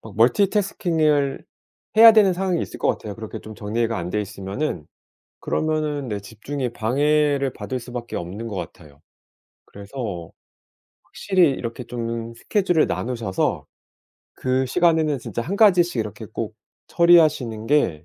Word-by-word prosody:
막 110 -3 -12
멀티태스킹을 155 - +2 0.5
해야 225 0 +11
되는 205 -4 +5
상황이 180 -1 -1
있을 - - -7
것 - - 0
같아요. 105 -2 -2
그렇게 110 0 -7
좀 110 - -10
정리가 115 +1 -2
안 85 0 -4
되어 105 - 0
있으면은. 100 - -4 0.5
그러면은 155 -3 -1
네 105 -1 -3
집중에 120 +6 -5
방해를 140 +3 +1
받을 130 - -5
수밖에 120 0 -7
없는 95 +7 -5
것 105 - -6
같아요. 75 -5 -9 0.7
그래서 100 -4 -7 0.7
확실히 185 -6 +2
이렇게 120 -1 -5
좀 115 -1 -5
스케줄을 175 - +1
나누셔서 115 -6 -2 0.7
그 130 +1 0
시간에는 160 -1 +2
진짜 115 - -5
1 180 +11 -3
가지씩 180 - +4
이렇게 105 -2 -6
꼭 - - -5 0.3
처리하시는 150 -10 +3
게 95 - +1
125 Hz, 315 characters per minute, -22 LUFS, 110-155 Hz, 0.7 s, 해야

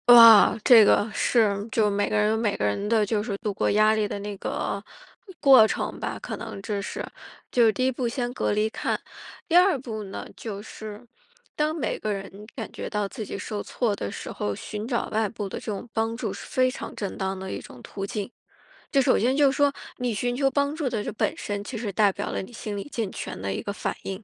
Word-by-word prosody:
哇， 230 -3 +9
这 235 -3 +9
个 205 +1 +4
是， 205 -3 +2
就 215 -2 +3
每 205 0 0
个 215 - +1
人 210 0 +3
有 220 - +1
每 220 -3 0
个 105 - 0
人 105 - -1
的 220 -2 +3
就 210 0 0
是 210 -3 -3
度 210 0 -3
过 - - 0
压 215 +1 +5
力 215 -1 +1
的 - - -4
那 205 0 -5
个 195 +1 -3 0.6
过 265 -5 +8
程 - - -3
吧， - - -3
可 - - -5
能 - - -7
这 205 0 -3
是 200 - -5 0.5
就 240 -2 +5
是 220 - +5
第 255 +5 -1
一 260 - +3
步 250 -1 -2
先 245 0 -3
隔 - - 0
离 210 +1 +2
看， - - -2 0.5
第 340 - +1
二 360 -2 +6
步 220 -4 -5
呢， 195 - -7
就 205 -3 -6
是， 215 +1 -9 0.5
当 305 +1 +1
每 310 - -2
个 215 - -2
人 195 +1 -6
感 225 - -5
觉 - - -5
到 210 -2 -1
自 220 +1 -6
己 - - -5
受 205 0 -4
挫 225 -5 -1
的 100 - -4
时 - - -6
候， 105 -1 -3
寻 210 - -6
找 240 -1 -1
外 215 -1 +1
部 210 -2 -5
的 - - -5
这 - - -13
种 205 +4 -5
帮 225 +1 -1
助 220 -5 -3
是 200 - -9
非 255 0 +2
常 255 - -7
正 200 -2 -4
当 190 -1 -2
的 190 0 -6
一 - - -4
种 125 - -12
途 195 - -7
径。 205 +1 -4 0.6
就 275 - +4
首 255 0 +3
先 250 +4 +2
就 285 -1 +5
是 - - -4
说， 285 -1 +4 0.3
你 250 -2 -1
寻 245 +4 -1
求 270 +1 +2
帮 280 +1 0
助 300 -5 -1
的 220 -4 -2
这 - - -3
本 - - -1
身， 205 -1 -3
其 235 +3 -6
实 215 -2 -3
代 205 +1 +4
表 - - -4
了 - - -2
你 190 - -10
心 215 -2 -5
理 200 - -5
健 225 -8 -3
全 - - -6
的 95 +1 -2
一 - - -3
个 200 - -4
反 - - -3
应， 195 +2 -5
215 Hz, 265 characters per minute, -25 LUFS, 200-245 Hz, 0.6 s, 哇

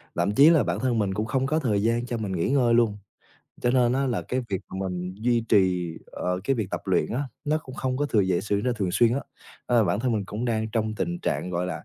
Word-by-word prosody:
lậm 100 - +1
chí 145 +6 +8
là 160 -5 +5
bản - - -2
thân 125 -3 0
mình 100 -2 0
cũng 105 +2 -1
không 130 +3 0
có 155 +3 +1
thời 105 -9 0
gian 115 +2 +1
cho 120 - -3
mình 105 -4 -3
nghỉ 85 +3 -1
ngơi 125 -4 +3
luôn, 115 -3 +3 0.6
cho 120 - +2
nên 125 -2 +3
á 135 +2 +1
là 120 -4 -1
cái 130 - -2
việc 95 -2 -2
mình 90 -1 -4
duy 115 +2 0
trì, 90 -5 +2
ờ, 90 0 -3
cái 135 - +2
việc 105 -5 -3
tập - - -3
luyện 95 -2 +1
á, 130 +5 -1 0.2
nó 155 +1 +1
cũng 130 - -10
không 130 -1 -2
có 145 +2 0
thường 105 -8 +2
dễ 90 -2 +1
xử 100 -1 -1
nên 125 -1 +1
thường 100 -5 -1
xuyên 115 +3 +4
á. 140 - -1 0.5
Ờ, 120 -3 +3
bản 100 +4 0
thân 125 -1 0
mình 105 -3 -1
cũng 105 +5 -5
đang 110 -2 -1
trong 110 0 -1
tình 175 +10 -2
trạng, 90 - -2
gọi 90 +1 -1
là, 90 - -5
115 Hz, 270 wpm, -25 LUFS, 95-125 Hz, 0.6 s, chí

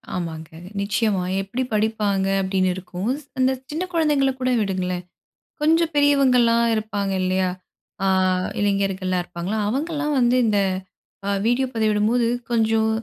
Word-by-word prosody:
ஆமாங்க. 160 -3 -5 0.3
நிச்சயமா 200 -1 0 0.2
"எப்பிடி 220 +7 -3
படிப்பாங்க?" 210 -3 +1
அப்பிடின்னு 190 -1 +1
இருக்கும். 185 +3 -5 0.3
அந்த 260 0 +3 0.2
சின்ன 320 +4 -2
குழந்தைங்கள 295 -5 +2
கூட 255 0 +1
விடுங்களேன். 185 -3 -2 0.6
கொஞ்சம் 325 +2 +3
பெரியவங்கள்லாம் 255 -5 +4
இருப்பாங்க 205 -2 -2
இல்லயா! 185 0 +1 0.6
ஆ - - +2 0.5
இளைஞர்கள்லாம் 195 -2 0
இருப்பாங்களா! 175 +4 -4
அவங்கள்லாம் 300 +4 -1
வந்து 245 0 +3
இந்த 210 -2 +2 0.7
அ - - 0 0.2
வீடியோ 245 +3 +2
பதிவிடும்போது, 220 +2 +2 0.2
கொஞ்சம் 220 -1 +2
215 Hz, 115 wpm, -22 LUFS, 190-255 Hz, 0.7 s, பெரியவங்கள்லாம்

